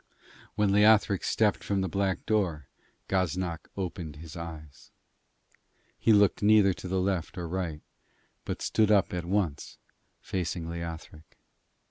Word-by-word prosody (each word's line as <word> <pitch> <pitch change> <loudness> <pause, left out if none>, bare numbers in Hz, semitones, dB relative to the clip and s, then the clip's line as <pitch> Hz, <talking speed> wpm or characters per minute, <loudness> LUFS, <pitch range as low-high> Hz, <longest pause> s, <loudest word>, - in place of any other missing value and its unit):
When 105 -2 +2
Leothric 105 -1 +4
stepped 105 -2 +1
from 100 -1 0
the 95 - -1
black 95 +1 -1
door, 90 -10 0 0.4
Gaznak 90 -3 -1
opened 85 -5 -4
his 80 +1 -10
eyes. 80 -4 -9 1.1
He 115 - +2
looked 100 -2 +4
neither 105 -2 +5
to 90 - -8
left 95 -2 -1
nor 85 -1 -4
right, 85 -3 -3 0.6
but - - -5
stood 110 -1 +2
up 100 -3 +3
at 90 -1 -3
once 90 -6 -2 0.4
facing 85 -2 -3
Leothric. 85 -2 -8
90 Hz, 125 wpm, -28 LUFS, 85-100 Hz, 1.1 s, neither